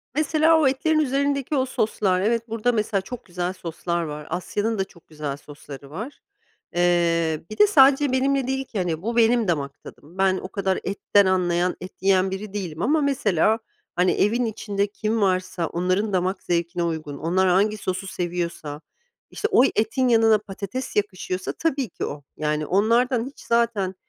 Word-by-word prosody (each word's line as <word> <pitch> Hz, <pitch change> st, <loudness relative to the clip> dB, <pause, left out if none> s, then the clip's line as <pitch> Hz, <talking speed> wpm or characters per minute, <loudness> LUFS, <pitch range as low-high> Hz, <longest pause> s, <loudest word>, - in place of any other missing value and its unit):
Mesela 315 Hz, +2 st, +3 dB
o 305 Hz, -, +4 dB
etlerin 310 Hz, +4 st, +1 dB
üzerindeki 280 Hz, 0 st, 0 dB
o 260 Hz, -2 st, +2 dB
soslar. 205 Hz, -7 st, 0 dB
Evet 230 Hz, +2 st, 0 dB
burada 225 Hz, +2 st, +1 dB
mesela 215 Hz, -3 st, 0 dB
çok 245 Hz, +5 st, -9 dB
güzel 180 Hz, 0 st, -3 dB
soslar 170 Hz, -1 st, -3 dB
var 150 Hz, -1 st, -6 dB
Asya'nın 205 Hz, +6 st, -2 dB
da -, -, +3 dB
çok 170 Hz, -3 st, -21 dB
güzel 150 Hz, -3 st, -5 dB
sosları 145 Hz, -1 st, -11 dB
var. 220 Hz, -, -7 dB, 0.5 s
Eee, 170 Hz, -2 st, +2 dB
bir 215 Hz, -, -8 dB
de 420 Hz, -, +7 dB
sadece 280 Hz, -5 st, +5 dB
benimle 270 Hz, 0 st, +1 dB
değil 265 Hz, 0 st, -1 dB
ki 225 Hz, -, -7 dB
hani 165 Hz, -3 st, -1 dB
bu 230 Hz, +4 st, -3 dB
benim 230 Hz, -1 st, +4 dB
damak 140 Hz, -5 st, -2 dB
tadım 165 Hz, +6 st, -14 dB
ben 190 Hz, -1 st, +3 dB
o -, -, -6 dB
kadar 190 Hz, -2 st, -1 dB
etten 200 Hz, +1 st, +2 dB
anlayan, 180 Hz, -1 st, +1 dB
et 185 Hz, -, -8 dB
yiyen 190 Hz, 0 st, +3 dB
biri 195 Hz, +1 st, -6 dB
değilim 175 Hz, -6 st, -4 dB
ama 300 Hz, -, +2 dB
mesela 220 Hz, -, +2 dB, 0.4 s
hani 180 Hz, +1 st, +3 dB
evin 235 Hz, +4 st, +1 dB
içinde 205 Hz, -2 st, -2 dB
kim 215 Hz, +2 st, -2 dB
varsa 185 Hz, -3 st, 0 dB
onların 185 Hz, +5 st, -1 dB
damak 185 Hz, +1 st, 0 dB
zevkine 170 Hz, 0 st, -1 dB
uygun 155 Hz, -4 st, -3 dB
onlar 185 Hz, +5 st, +1 dB
hangi 205 Hz, +4 st, +2 dB
sosu 190 Hz, -1 st, -3 dB
seviyorsa 170 Hz, -5 st, -4 dB, 0.5 s
işte 430 Hz, -, -2 dB
oy 255 Hz, -, +5 dB
etin 230 Hz, +4 st, +1 dB
yanına 225 Hz, -2 st, +5 dB
patates 210 Hz, +4 st, -6 dB
yakışıyorsa 185 Hz, -2 st, -2 dB
tabii 275 Hz, -7 st, -1 dB
ki -, -, -5 dB
o. 145 Hz, 0 st, -6 dB
Yani, 150 Hz, 0 st, -1 dB
onlardan 230 Hz, -, +2 dB
hiç 275 Hz, -, -11 dB
zaten, 230 Hz, -5 st, 0 dB
195 Hz, 170 wpm, -23 LUFS, 175-235 Hz, 0.5 s, de